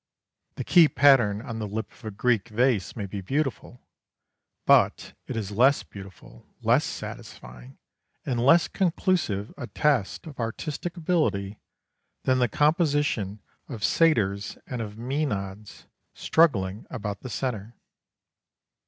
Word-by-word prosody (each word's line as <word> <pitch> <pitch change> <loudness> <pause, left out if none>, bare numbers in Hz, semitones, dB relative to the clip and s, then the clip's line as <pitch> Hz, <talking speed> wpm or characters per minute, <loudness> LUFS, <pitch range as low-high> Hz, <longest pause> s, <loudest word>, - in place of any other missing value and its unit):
The - - -4
key 170 -3 +6
pattern 120 -9 +4
on 115 -4 -6
the 105 - -3
lip 110 +2 -5
of - - -21
a 110 - -4
Greek 115 +1 0
vase 115 -3 +1
may 105 - -4
be 100 +1 -6
beautiful, 135 +2 -3 0.8
but - - +3
it - - -5
is 105 -3 -4
less 130 +7 +3
beautiful, 95 -11 -13 0.2
less - - +4
satisfying, - - -9 0.5
and 120 -3 -1
less 165 +6 +5
conclusive 170 - 0
a 120 - -5
test 145 - 0
of 150 -5 -11
artistic 150 +9 -4
ability 150 - 0 0.6
than 130 -1 +2
the 125 - +3
composition 145 - +1 0.3
of 115 -6 -7
satyrs 110 -13 +2
and 125 -2 -5
of 105 -2 -6
mænads 110 -6 -4 0.3
struggling 105 - +1
about 105 -5 -5
the 130 - -8
centre. 115 -3 -4
115 Hz, 125 wpm, -26 LUFS, 100-145 Hz, 0.8 s, key